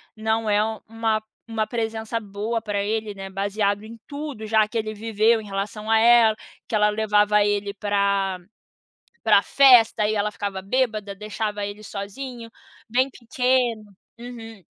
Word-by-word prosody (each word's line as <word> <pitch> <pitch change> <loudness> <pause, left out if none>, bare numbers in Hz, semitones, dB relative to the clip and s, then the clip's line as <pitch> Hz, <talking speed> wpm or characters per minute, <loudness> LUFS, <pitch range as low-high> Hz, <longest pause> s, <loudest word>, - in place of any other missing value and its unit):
não 220 0 -1
é 205 0 +3 0.3
uma 225 -1 -1 0.3
uma 220 -1 -1
presença 225 -1 -3
boa 215 +2 -3
pra 205 -2 -2
ele, 215 0 -2
né, 195 0 -7
baseado 200 +1 -1
em 225 +1 -10
tudo 285 -6 -6
já 215 -1 +3
que 230 - -4
ele 215 -1 -2
viveu 220 +1 +2
em - - -11
relação 205 +2 -4
a 225 - +6
ela", 230 -1 +6 0.3
que - - -2
ela 210 0 +4
levava 210 -1 +3
ele 205 0 -1
pra 200 -2 0 0.8
pra - - +5
festa 245 -6 +5
e 215 - 0
ela 210 0 0
ficava 200 -2 -4
bêbada, 215 -3 -1
deixava 210 0 -4
ele 205 +1 -7
sozinho, 230 +4 -7 0.4
bem 255 +3 +2
pequeno. 240 -4 -1 0.2
Uhum. 225 -5 -10
215 Hz, 150 wpm, -23 LUFS, 205-225 Hz, 0.8 s, a